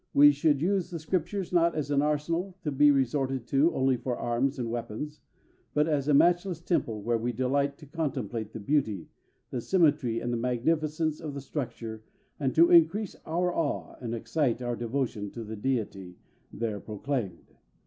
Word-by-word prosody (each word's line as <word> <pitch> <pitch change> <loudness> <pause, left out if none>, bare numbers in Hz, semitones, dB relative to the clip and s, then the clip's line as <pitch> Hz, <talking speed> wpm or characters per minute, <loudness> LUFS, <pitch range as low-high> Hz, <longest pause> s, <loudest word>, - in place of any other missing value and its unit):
We 145 +1 +9
should 145 0 +2
use 190 -1 +1
the 175 - -4
Scriptures 180 +3 -2
not 170 -1 +3
as 145 -2 -2
an 140 -1 +3
arsenal, 165 +5 -1
to 150 - -1
be 145 +2 +5
resorted 135 -2 +1
to 145 +5 +4
only 130 -1 +2
for 125 0 -3
arms 130 +4 0
and 120 -3 -3
weapons, 120 +6 -5 0.6
but 150 +1 +3
as 145 -3 0
a 150 - +4
matchless 175 +3 +3
temple 115 - -1
where 115 +1 +1
we 120 +2 -1
delight 140 +4 0
to 155 - -13
contemplate 130 - -3
the 115 - -7
beauty, 110 - 0 0.4
the 125 - -2
symmetry, 145 -9 +2
and 120 - -2
the - - 0
magnificence 155 +6 0
of 150 -3 -6
the - - -3
structure, 115 -5 -5 0.4
and 135 -3 -1
to 170 +1 +6
increase 175 +5 +4
our 175 +2 0
awe 160 -4 -2
and 120 -1 -3
excite 125 +1 0
our 120 -1 -2
devotion 115 -3 -2
to 115 - -6
the 110 0 -6
Deity 105 -6 -3 0.3
there 110 -2 -3
proclaimed. 105 -3 -4
140 Hz, 175 wpm, -28 LUFS, 120-155 Hz, 0.6 s, We